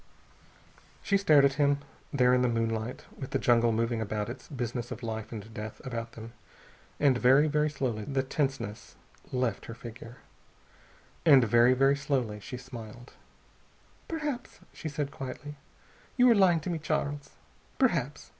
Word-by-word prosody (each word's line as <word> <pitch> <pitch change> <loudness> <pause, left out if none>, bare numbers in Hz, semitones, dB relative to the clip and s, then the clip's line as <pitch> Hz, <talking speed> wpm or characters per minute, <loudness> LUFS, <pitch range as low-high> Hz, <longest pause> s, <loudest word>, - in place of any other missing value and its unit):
She 200 - +1
stared 155 -8 +5
at 140 - +3
him, 145 0 +4 0.3
there 125 -2 +4
in 125 - +4
the 125 - +3
moonlight 115 0 -2
with 135 - -7
the - - 0
jungle 120 -1 +3
moving 115 +1 0
about 105 0 -2
its 120 - -8
business 120 -3 -4
of 120 0 -7
life 110 -1 -4
and 110 -1 -8
death 110 0 -7
about 115 -2 -5
them. 115 0 -10 0.7
And 135 -4 +4
very, 135 +5 +5
very 150 0 +1
slowly 125 -7 -3
the 135 -1 0
tenseness 135 -6 -3 0.4
left 125 -5 -1
her 115 - -7
figure. 115 +1 -10 1.1
And 140 -6 +7
very, 120 +3 +5
very 135 +2 +4
slowly 130 -7 -1
she 125 +5 -7
smiled. 120 -1 -10 0.9
"Perhaps," 300 -6 -4
she 160 - -6
said 145 -1 -3
quietly, 135 +2 -7 0.6
"you 250 0 +6
are - - +8
lying 180 -5 +4
to 175 - -3
me, 165 - -2
Charles. 145 -2 -2 0.5
Perhaps. 160 - 0
125 Hz, 155 wpm, -29 LUFS, 115-145 Hz, 1.1 s, are